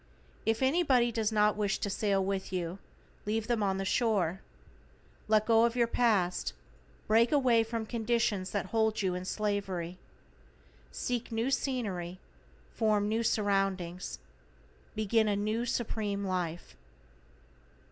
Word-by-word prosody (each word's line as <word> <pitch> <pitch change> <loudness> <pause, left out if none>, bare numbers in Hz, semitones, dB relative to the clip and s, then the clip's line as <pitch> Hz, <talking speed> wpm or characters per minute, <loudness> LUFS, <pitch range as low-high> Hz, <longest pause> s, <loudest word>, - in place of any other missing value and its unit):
If 225 +3 +2
anybody 260 -5 +3
does 225 -1 0
not 210 -1 +3
wish 205 -1 0
to - - -3
sail 195 -1 0
with 195 -1 -2
you, 180 0 -3 0.5
leave 220 +1 0
them 235 -2 0
on 195 -2 +1
the 195 - -2
shore. 190 -5 +1 0.9
Let 215 0 +3
go 225 0 +5
of 235 0 +2
your 240 -1 +3
past, 215 -7 +1 0.5
break 230 +2 +4
away 250 -6 +4
from 225 0 -4
conditions 225 -4 0
that 200 -2 -2
hold 220 -2 +1
you 185 -1 +1
in 180 0 -4
slavery. 190 -4 -2 0.9
Seek 235 - -3
new 230 +4 0
scenery, 200 -10 -2 0.5
form 210 -2 +2
new 220 +2 0
surroundings, 195 -5 0 0.8
begin 220 +1 +2
a 205 - +2
new 215 +4 -1
Supreme 210 -4 -2
Life. 175 - -3
215 Hz, 130 wpm, -31 LUFS, 195-230 Hz, 0.9 s, go